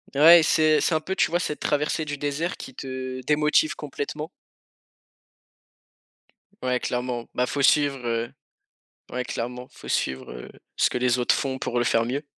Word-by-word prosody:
Ouais, 165 +4 +9
c'est 155 0 +4
c'est 165 - +1
un 155 - +1
peu, 190 +4 -4
tu - - +3
vois? 175 +2 +1
Cette 150 -4 -3
traversée 150 +1 0
du 145 -1 -4
désert 145 +5 -2
qui 130 - -9
te 130 0 -6
démotive 150 +2 +2
complètement. 150 +1 -5 2.3
Ouais, 125 0 +1
clairement, 125 -1 -3
bah, 125 - +2
faut 140 +3 -2
suivre, 140 -1 +3
heu 115 0 -2 0.8
ouais 125 0 -3
clairement, 125 +2 -5
faut - - -12
suivre, 65 -1 -1
heu, - - -9 0.3
ce - - +3
que - - -4
les 125 0 +2
autres 125 - +3
font 130 -1 -2
pour 120 -1 -2
le 120 - +2
faire 115 -1 +2
mieux. 140 +4 -3
135 Hz, 170 wpm, -25 LUFS, 125-150 Hz, 2.3 s, Ouais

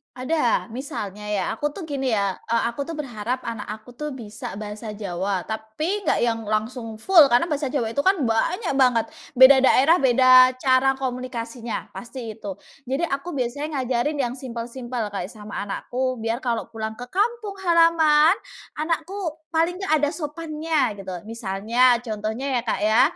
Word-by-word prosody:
Ada. 255 -3 0
Misalnya 210 -5 -6
ya 205 -2 0
aku 295 +6 -3
tuh 390 - -6
gini 280 -4 -3
ya, 200 -2 -1
e 230 - +1 0.2
aku 280 +4 -5
tuh 330 - -5
berharap 250 -3 -4
anak 230 -3 -5
aku 215 +3 -8
tuh 295 +3 -6
bisa 215 -5 -7
bahasa 210 +1 -6
Jawa, 190 -2 -2
tapi 295 - -4
nggak - - +3
yang 230 -1 +1
langsung 225 +1 -2
full 315 - +6
karena 245 +1 +4
bahasa 290 -1 0
Jawa 245 -5 -1
itu 280 - -3
kan 375 -1 +3
banyak 260 - 0
banget, 245 -4 +4 0.3
beda 260 +2 +9
daerah 275 +5 +5
beda 255 0 +6
cara 260 +1 +3
komunikasinya, 245 -3 -5
pasti 240 -1 -7
itu. 205 -3 -7 0.3
Jadi 270 +6 -1
aku 285 +1 -2
biasanya 285 +4 -3
ngajarin 255 +4 0
yang 250 -4 -1
simple-simple 240 -2 -5
kayak 195 -3 -4
sama 210 -1 -8
anakku 255 +5 -2
biar 225 +1 -2
kalau 235 -5 -1
pulang 220 -1 -4
ke 245 +1 -9
kampung 420 0 -1
halaman, 330 -1 +5 0.4
anakku 335 +5 -2 0.3
paling 330 +2 +1
nggak 310 -6 +2
ada 290 +1 0
sopannya 305 -5 -1
gitu. 195 -2 -8 0.2
Misalnya, 230 +3 +2
contohnya 225 +3 -3
ya - - -3
Kak 225 - -1
ya, 215 +3 +4
250 Hz, 160 wpm, -23 LUFS, 220-295 Hz, 0.4 s, beda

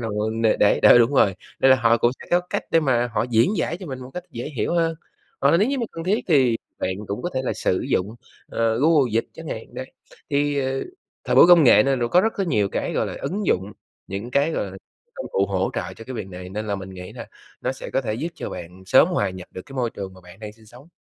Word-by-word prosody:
là 115 - -3
người 105 +1 -1
để 110 - +3
để 105 - +3
đó, - - +8
đúng 120 +4 +3
rồi! 100 -8 +4 0.3
Nên 135 - +5
là 130 - +7
họ 115 -1 +3
cũng 120 - +3
sẽ - - -11
có 175 +1 +4
cách - - -2
để 165 - +4
mà 120 -4 +1
họ 115 - +1
diễn 120 - +3
giải 165 0 -1
cho 180 0 -9
mình 130 -2 -6
một 130 +1 -9
cách 180 0 -5
dễ 120 +5 -6
hiểu 170 - 0
hơn. 165 -1 +1 0.5
Hoặc 140 +4 +4
nếu 215 +6 +2
như 275 -1 -1
mà 235 - -1
cần 165 0 -6
thiết 205 +4 0
thì 130 -7 +4 0.2
bạn 95 - -1
cũng 100 - -4
có 175 - -2
thể 130 - 0
là - - 0
sử 90 - 0
dụng, 100 +4 0 0.3
ờ, 115 0 0
Google 145 -5 +3
Dịch 115 - +1
chẳng - - -9
hạn, - - -7
đấy. - - -7 0.4
Thì, 145 0 +1
ờ, 135 0 -2 0.4
thời - - 0
buổi - - +9
công 175 -3 +7
nghệ 115 -4 +7
nên 135 -2 0
là 120 - 0
có 180 - +5
rất 225 +3 +1
cái 195 -2 -1
nhiều 105 -10 +1
cái, - - -3
gọi - - 0
là, - - -6
ứng 200 +1 -3
dụng, 95 +3 0 0.3
những 100 +5 -6
cái, 140 +4 +2
gọi 160 - -1
là, 95 - -10 0.4
công - - -6
cụ 100 0 +2
hỗ 95 0 -1
trợ - - -4
cho 115 - -10
cái 130 - -7
việc 110 - -5
này 90 0 -8
nên 105 +3 -5
là 100 - -1
mình 95 -1 -7
nghĩ 90 -1 -9
là - - -8 0.3
nó - - -1
sẽ - - -9
có - - +1
thể 110 -5 -3
giúp 155 +9 -3
cho - - -6
bạn 90 +2 -9
sớm 140 - +6
hòa 105 - 0
nhập 90 -1 -10
được 95 - -8
cái 135 - -12
môi 120 -3 0
trường 95 -1 -7
mà 95 - -15
bạn 90 +1 -15
đang 105 -1 -7
sinh 110 0 -21
sống. 125 +7 -16
120 Hz, 285 wpm, -23 LUFS, 100-150 Hz, 0.5 s, buổi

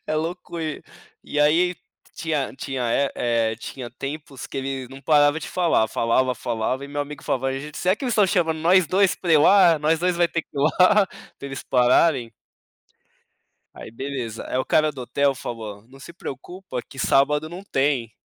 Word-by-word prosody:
É 155 - -1
loucura, 165 -1 -4 0.4
e 150 - -4
aí, 170 +5 +3 0.4
tinha 155 -5 -2
tinha, 135 -1 -4
eh 140 +2 +2 0.4
eh, - - -7
tinha 120 +1 -7
tempos 135 +1 -7
que - - -9
ele 135 -1 -4
não 135 +1 -11
parava 145 0 +4
de - - -7
falar, 170 -11 +2
falava, 125 +3 +1
falava 120 +3 -2
e - - -9
meu 145 +1 -3
amigo 145 0 -6
falava: 135 0 -1
"Ai, 135 0 -3
gente 150 +1 -8
será 185 +1 +2
que 215 - -8
eles 245 - 0
estão 210 -2 +4
chamando 170 -4 +1
nós 175 +2 +4
2 190 +3 +3
pra 175 -3 -1
ir 155 - +7
lá, 175 0 +6
nós 155 +2 +1
2 180 0 +1
vai 175 0 +3
ter 165 0 -3
que - - -42
ir 140 - 0
lá, 185 +7 +4
pra - - -16 0.3
eles 135 -1 -6
pararem?" 125 0 +3 1.4
Aí - - -10
beleza, 120 -2 -5
é 125 - -2
o 130 - 0
cara 155 0 +2
do 135 -4 -8
hotel 140 +2 +1
falou: 110 -5 -7
"Não 135 +1 -16
se 170 - -11
preocupa, 170 -1 -7
que 135 - -15
sábado 150 +4 +2
não 180 +3 -8
tem." 135 - 0
145 Hz, 195 wpm, -23 LUFS, 130-170 Hz, 1.4 s, ir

